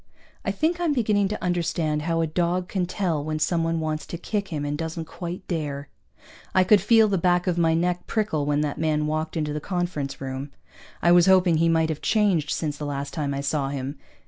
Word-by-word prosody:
I - - -1
think 335 +3 0
I'm 340 -4 +1
beginning 210 -6 +2
to 210 +1 -5
understand 165 -3 0
how 165 +1 0
a - - +2
dog 175 +3 0
can 185 -2 -1
tell 175 -6 -1
when 155 0 -2
someone 165 +1 0
wants 155 -1 -3
to 170 - -5
kick 200 +3 -3
him 150 -4 -3
and 145 0 -2
doesn't 160 +1 -4
quite 175 +3 -7
dare. 145 -4 -3 0.7
I 185 - +6
could 205 +1 +5
feel 225 +2 +5
the 195 -3 +1
back 175 0 +2
of 180 -3 +1
my 165 -1 +3
neck 175 +1 -1
prickle 180 -10 0
when 145 0 +2
that 150 0 -2
man 155 -1 +1
walked 155 +2 -2
into 150 -2 -1
the 150 - -2
conference 175 -6 -3
room. 135 +1 -5 0.5
I 170 - +5
was 175 0 +6
hoping 185 -3 +5
he 165 +1 +3
might 160 -1 +2
have 155 -2 -3
changed 195 -9 +2
since 150 -3 -2
the 150 - -4
last 140 0 -4
time 145 -3 -2
I 140 0 -2
saw 140 -1 -1
him. 140 +1 -5
165 Hz, 220 wpm, -25 LUFS, 150-180 Hz, 0.7 s, I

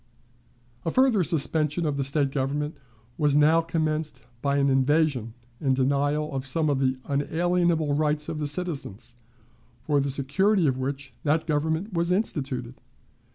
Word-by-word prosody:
A - - -1
further 250 -2 +3
subversion 155 0 +1
of 150 -2 0
the 140 - -1
State 140 0 +1
government 145 +3 -2 0.4
was 145 -2 +3
now 155 +3 +5
commenced 155 -2 -2 0.2
by 140 0 +1
an 140 0 +3
invasion 135 -3 +1 0.2
and 135 -3 +1
denial 145 +3 0
of 135 - -2
some 155 +2 +1
of 135 - 0
the 130 -1 +1
unalienable 165 +2 +1
rights 150 0 0
of 155 - -4
the 150 - -1
citizens, 145 - -4 0.7
for 145 -2 +1
the 140 0 0
security 170 +9 +2
of 130 -3 +1
which 135 0 -4
that 155 +2 +1
government 160 +6 -1
was 170 +1 0
instituted. 135 - -2
150 Hz, 150 wpm, -26 LUFS, 140-160 Hz, 0.7 s, now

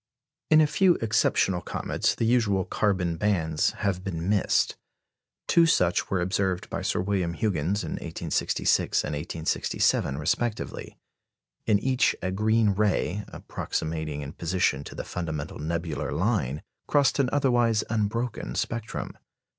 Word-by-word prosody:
] 150 +3 -64
In 155 0 +7
a - - +6
few 180 +3 +3
exceptional 95 -4 +1
comets - - -1
the 115 - -1
usual 110 -6 +2
carbon 95 -5 0
bands 80 -6 +1 0.2
have 95 -2 0
been 85 -3 -4
missed. 100 -1 +2 0.7
Two 170 -1 +5
such 90 - +2
were 95 -2 0
observed 95 -1 -1
by - - -2
Sir - - 0
William 95 -3 -1
Huggins 95 0 0
in - - -5
1866 80 -1 0
and 75 - -3
1867 75 -2 0
respectively. 105 +9 -2 0.7
In 105 -2 +5
each 130 +4 +2
a 95 - -1
green 110 +2 +2
ray, 105 0 0
approximating 80 -2 -4
in 70 +2 -7
position 85 -4 0
to - - -9
the - - -4
fundamental 80 -4 -5
nebular 80 -2 -3
line, 80 - 0 0.2
crossed 145 -1 +3
an 130 -3 +3
otherwise 120 -6 +2
unbroken 110 +2 -2
spectrum. 115 -2 -3
95 Hz, 135 wpm, -26 LUFS, 85-110 Hz, 0.7 s, In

